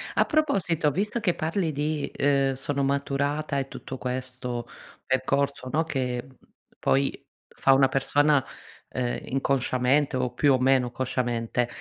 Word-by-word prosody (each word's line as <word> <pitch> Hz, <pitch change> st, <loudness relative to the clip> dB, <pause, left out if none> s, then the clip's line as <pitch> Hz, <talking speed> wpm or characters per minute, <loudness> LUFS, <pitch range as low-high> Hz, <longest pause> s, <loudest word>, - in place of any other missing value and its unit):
A -, -, +4 dB
proposito, 195 Hz, -, +1 dB
visto 210 Hz, -, -1 dB
che 200 Hz, -6 st, +1 dB
parli 165 Hz, +1 st, -1 dB
di, 150 Hz, +1 st, -2 dB
uhm, 135 Hz, -1 st, +3 dB
sono 140 Hz, +1 st, -2 dB
maturata 140 Hz, +1 st, 0 dB
e 135 Hz, -1 st, -1 dB
tutto 130 Hz, 0 st, -8 dB
questo 125 Hz, -1 st, -4 dB, 0.4 s
percorso, 135 Hz, 0 st, 0 dB
no, 160 Hz, +1 st, +2 dB
che, 125 Hz, -5 st, -2 dB
mhmm, 130 Hz, -1 st, -18 dB, 0.4 s
poi 135 Hz, 0 st, 0 dB, 0.2 s
fa 135 Hz, -, +3 dB
una 135 Hz, 0 st, +5 dB
persona, 140 Hz, +1 st, +2 dB, 0.5 s
uhm, 125 Hz, -1 st, -1 dB
inconsciamente, 135 Hz, +1 st, +1 dB
o 125 Hz, -1 st, -1 dB
più 145 Hz, -2 st, +4 dB
o 130 Hz, -, +2 dB
meno 130 Hz, -1 st, +3 dB
consciamente, 120 Hz, -2 st, -1 dB
135 Hz, 135 wpm, -26 LUFS, 130-145 Hz, 0.5 s, una